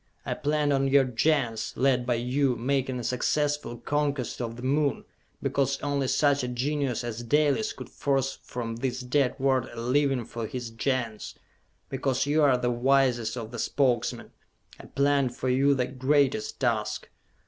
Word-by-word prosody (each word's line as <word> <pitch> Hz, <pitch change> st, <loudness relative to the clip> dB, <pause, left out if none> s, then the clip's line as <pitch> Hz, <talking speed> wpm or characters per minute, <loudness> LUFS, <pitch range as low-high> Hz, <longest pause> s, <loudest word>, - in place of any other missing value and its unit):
I -, -, -1 dB
planned 150 Hz, 0 st, 0 dB
on 135 Hz, 0 st, +2 dB
your 135 Hz, 0 st, +5 dB
Gens, 125 Hz, -3 st, 0 dB
led 130 Hz, -2 st, +2 dB
by 120 Hz, -, +2 dB
you, 125 Hz, +2 st, +1 dB
making 130 Hz, +1 st, -1 dB
a -, -, -5 dB
successful 145 Hz, +1 st, -1 dB
conquest 145 Hz, -2 st, -2 dB
of 115 Hz, -1 st, -4 dB
the 120 Hz, -, -9 dB
Moon 140 Hz, +2 st, +1 dB, 0.4 s
because 140 Hz, 0 st, 0 dB
only 140 Hz, -2 st, 0 dB
such 145 Hz, 0 st, +3 dB
a -, -, -1 dB
genius 130 Hz, 0 st, -1 dB
as 120 Hz, -1 st, -4 dB
Dalis 150 Hz, -, +2 dB
could -, -, -9 dB
force 135 Hz, -1 st, -1 dB
from 115 Hz, -2 st, -5 dB
this 130 Hz, +1 st, -2 dB
dead 125 Hz, +1 st, +1 dB
world 130 Hz, -2 st, +1 dB
a 120 Hz, -, -8 dB
living 130 Hz, 0 st, +1 dB
for 115 Hz, -1 st, -5 dB
his 120 Hz, 0 st, -5 dB
Gens! 115 Hz, -2 st, -2 dB, 0.5 s
Because 135 Hz, -1 st, -1 dB
you 150 Hz, +2 st, +2 dB
are 135 Hz, -4 st, +5 dB
the 125 Hz, 0 st, 0 dB
wisest 125 Hz, -2 st, +2 dB
of 115 Hz, -1 st, -6 dB
the 120 Hz, -, -6 dB
Spokesmen, 130 Hz, -3 st, 0 dB, 0.5 s
I -, -, -11 dB
planned 140 Hz, -2 st, +1 dB
for 130 Hz, -, -2 dB
you 140 Hz, +2 st, +3 dB
the 125 Hz, -2 st, +1 dB
greatest 130 Hz, -2 st, +1 dB
task! 110 Hz, -4 st, -1 dB
130 Hz, 165 wpm, -27 LUFS, 120-140 Hz, 0.5 s, your